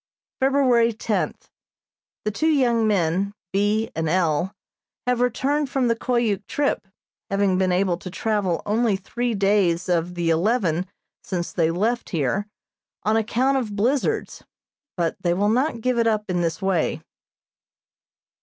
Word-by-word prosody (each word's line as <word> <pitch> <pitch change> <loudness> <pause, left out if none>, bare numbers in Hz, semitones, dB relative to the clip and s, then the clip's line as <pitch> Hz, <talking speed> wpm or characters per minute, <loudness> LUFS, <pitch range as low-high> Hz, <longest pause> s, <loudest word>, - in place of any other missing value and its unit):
February 255 -4 +3
tenth: 215 0 -3 0.7
The 215 - +1
two 315 +10 +1
young 240 -7 +3
men, 195 0 +1 0.2
B. 205 +3 +1
and 160 0 -1
L., 170 0 +1 0.5
have 250 -1 +1
returned 275 +4 +1
from 265 -2 +1
the 230 - +2
Koyuk 230 -4 0
trip, 280 -8 -1 0.4
having 195 -2 +2
been 185 -1 +2
able 180 -1 +1
to 185 - -8
travel 200 -3 -1
only 215 0 +2
three 235 +5 -2
days 195 -4 +2
of 175 0 0
the 170 -1 +1
eleven 180 -1 +1 0.4
since 175 -3 -3
they 165 -3 +2
left 220 +8 -1
here 170 +6 -1 0.6
on 215 +1 +2
account 245 +5 +1
of 220 -6 -3
blizzards, 245 +7 0 0.5
but 170 -2 0
they 175 -1 +1
will 205 +3 +2
not 245 +1 +1
give 250 0 +1
it 230 - +3
up 215 -3 0
in 175 -1 0
this 165 0 -2
way. 190 -4 0
205 Hz, 145 wpm, -23 LUFS, 180-235 Hz, 0.7 s, February